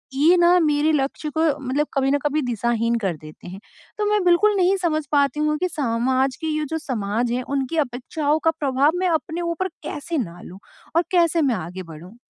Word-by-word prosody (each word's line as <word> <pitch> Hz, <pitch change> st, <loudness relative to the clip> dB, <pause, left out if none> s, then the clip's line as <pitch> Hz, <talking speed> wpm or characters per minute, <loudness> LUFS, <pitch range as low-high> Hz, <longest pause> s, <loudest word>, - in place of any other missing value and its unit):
ये 320 Hz, +6 st, +5 dB
ना 350 Hz, +1 st, +5 dB
मेरे 300 Hz, -1 st, +2 dB
लक्ष्य 285 Hz, +2 st, -1 dB
को -, -, +2 dB, 0.2 s
मतलब 275 Hz, +3 st, -1 dB
कभी 270 Hz, -1 st, +1 dB
न 285 Hz, -, +3 dB
कभी 295 Hz, +1 st, +1 dB
दिशाहीन 235 Hz, 0 st, 0 dB
कर 190 Hz, -6 st, -1 dB
देते 155 Hz, +3 st, -13 dB
हैं। 190 Hz, +2 st, -9 dB, 0.4 s
तो 420 Hz, -, 0 dB
मैं 420 Hz, -3 st, +2 dB
बिल्कुल 400 Hz, +4 st, +4 dB
नहीं 370 Hz, +1 st, +3 dB
समझ 315 Hz, -4 st, 0 dB
पाती 285 Hz, 0 st, +2 dB
हूँ 300 Hz, 0 st, +1 dB
कि 365 Hz, -, +1 dB
सामाज 260 Hz, -1 st, 0 dB
के 320 Hz, -, -2 dB
ये 305 Hz, -1 st, -1 dB
जो 320 Hz, -, -2 dB
समाज 235 Hz, -3 st, -2 dB
है 250 Hz, +1 st, -1 dB
उनकी 275 Hz, +4 st, -2 dB
अपेक्षाओं 285 Hz, +5 st, -2 dB
का 325 Hz, -, +5 dB
प्रभाव 280 Hz, +1 st, +2 dB
मैं 370 Hz, -1 st, +1 dB
अपने 320 Hz, +1 st, -1 dB
ऊपर 340 Hz, +2 st, -2 dB, 0.2 s
कैसे 320 Hz, +2 st, -4 dB
ना 175 Hz, -6 st, -5 dB
लूँ 185 Hz, +2 st, -11 dB, 0.4 s
और 345 Hz, -, +4 dB
कैसे 335 Hz, -2 st, +3 dB
मैं 255 Hz, -5 st, +2 dB
आगे 180 Hz, +2 st, -6 dB
बढ़ूँ? 170 Hz, +7 st, -12 dB
290 Hz, 205 wpm, -22 LUFS, 240-320 Hz, 0.4 s, ये